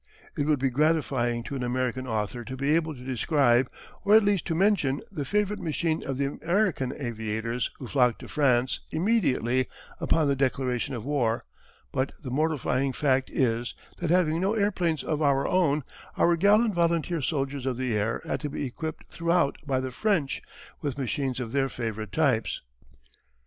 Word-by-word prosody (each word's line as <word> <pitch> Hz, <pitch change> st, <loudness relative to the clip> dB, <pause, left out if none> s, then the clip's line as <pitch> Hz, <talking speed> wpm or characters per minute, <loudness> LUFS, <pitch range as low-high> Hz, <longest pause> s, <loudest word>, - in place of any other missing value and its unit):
It 145 Hz, -, -1 dB
would 150 Hz, -1 st, +3 dB
be 135 Hz, 0 st, 0 dB
gratifying 135 Hz, -5 st, +1 dB
to 140 Hz, -, -5 dB
an 130 Hz, -, -3 dB
American 130 Hz, +1 st, -1 dB
author 110 Hz, +1 st, -2 dB
to 130 Hz, +2 st, -7 dB
be 140 Hz, +3 st, +1 dB
able 160 Hz, -1 st, +1 dB
to 125 Hz, -, -11 dB
describe, 130 Hz, -1 st, +2 dB, 0.3 s
or 205 Hz, +1 st, +5 dB
at 220 Hz, -, +7 dB
least 200 Hz, -3 st, +1 dB
to 165 Hz, -, 0 dB
mention, 175 Hz, -8 st, +2 dB
the 145 Hz, -, -4 dB
favourite 210 Hz, +4 st, 0 dB
machine 160 Hz, 0 st, -1 dB
of 135 Hz, -1 st, -3 dB
the 140 Hz, -, +1 dB, 0.2 s
American 175 Hz, -8 st, +1 dB
aviators 115 Hz, -1 st, -2 dB
who 130 Hz, -, -7 dB
flocked 125 Hz, -1 st, +2 dB
to -, -, -9 dB
France 130 Hz, -4 st, +2 dB
immediately 145 Hz, -, +1 dB, 0.3 s
upon 155 Hz, -2 st, +2 dB
the 140 Hz, -, +2 dB
declaration 130 Hz, -1 st, 0 dB
of 115 Hz, -, -6 dB
war, 125 Hz, -6 st, 0 dB, 0.5 s
but 130 Hz, +1 st, -1 dB
the 130 Hz, -5 st, -7 dB
mortifying 135 Hz, -2 st, 0 dB
fact 135 Hz, -2 st, +1 dB
is 120 Hz, -2 st, 0 dB, 0.2 s
that 170 Hz, -, -2 dB
having 170 Hz, -2 st, +3 dB
no 195 Hz, +4 st, +1 dB
airplanes 185 Hz, -7 st, +1 dB
of 155 Hz, -1 st, -1 dB
our 140 Hz, -2 st, +3 dB
own, 155 Hz, -6 st, +2 dB, 0.3 s
our 170 Hz, -, +4 dB
gallant 210 Hz, +5 st, +4 dB
volunteer 170 Hz, -1 st, +1 dB
soldiers 140 Hz, -2 st, -2 dB
of 125 Hz, -2 st, -1 dB
the 125 Hz, -3 st, -1 dB
air 105 Hz, +2 st, -1 dB
had -, -, -2 dB
to 150 Hz, -, -3 dB
be 145 Hz, -, -3 dB
equipped 155 Hz, +5 st, -5 dB
throughout 170 Hz, -3 st, +1 dB
by 130 Hz, -2 st, +1 dB
the 130 Hz, 0 st, -3 dB
French 170 Hz, -, 0 dB, 0.4 s
with 140 Hz, -3 st, -3 dB
machines 135 Hz, -1 st, -2 dB
of 120 Hz, -3 st, -4 dB
their 135 Hz, 0 st, +1 dB
favourite 110 Hz, -4 st, -4 dB
types. 130 Hz, -6 st, +1 dB
140 Hz, 175 wpm, -27 LUFS, 125-165 Hz, 0.5 s, at